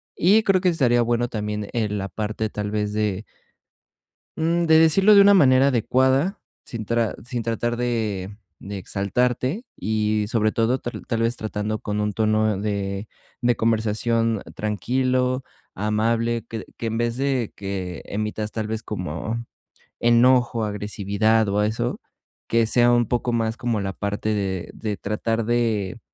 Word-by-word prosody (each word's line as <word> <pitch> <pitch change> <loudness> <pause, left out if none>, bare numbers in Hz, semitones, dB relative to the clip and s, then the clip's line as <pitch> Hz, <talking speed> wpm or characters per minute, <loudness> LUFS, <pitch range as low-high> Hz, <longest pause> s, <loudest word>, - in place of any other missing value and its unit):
y 205 +6 +4
creo 190 -3 +3
que 185 - +3
estaría 125 -8 +3
bueno 120 +1 +1
también, 105 -2 -4
eh, 110 -3 0
la 100 -1 -3
parte 110 +1 -3
tal 105 -1 -4
vez 105 -1 -1
de 105 -1 -1 1.1
mm, 170 +2 +1
de 160 -1 +6
decirlo 190 +6 +6
de 200 - +9
una 200 0 +7
manera 135 -7 +5
adecuada, 130 - +2 0.3
sin 115 -2 -6
tra 115 0 0
sin 120 -1 -3
tratar 115 +1 -1
de 110 -5 -2 0.3
de 100 0 -6
exaltarte 125 - -1
y, 110 -1 0
sobre 110 -1 +1
todo, 115 +4 +1
ta 120 - -5 0.2
tal 115 -2 -1
vez 115 +1 0
tratando 110 0 -3
con 105 0 -2
un 105 0 -1
tono 110 0 +1
de 100 0 -3 0.3
de 120 0 +3
conversación 115 0 +1
tranquilo, 125 +5 0 0.3
amable, 115 +3 0
que 110 -1 -5
que - - -5
en 115 0 -2
vez 120 0 -1
de 135 -4 -1
que 95 -3 -5
emitas 105 +1 -3
tal 110 -1 -3
vez 110 0 -3
como 110 +3 -4 0.6
enojo, 120 -1 +4
agresividad 105 +1 0
o 100 +1 +1
eso, 110 +2 -1 0.5
que 115 0 +3
sea 120 +2 +4
un 120 -1 +3
poco 120 +1 -1
más 115 -1 0
como 115 -3 -1
la 95 -1 -3
parte 100 +2 -2
de 95 -3 -3
de 105 -2 -4
tratar 115 +3 -2
de 110 -5 0
110 Hz, 155 wpm, -23 LUFS, 105-120 Hz, 1.1 s, de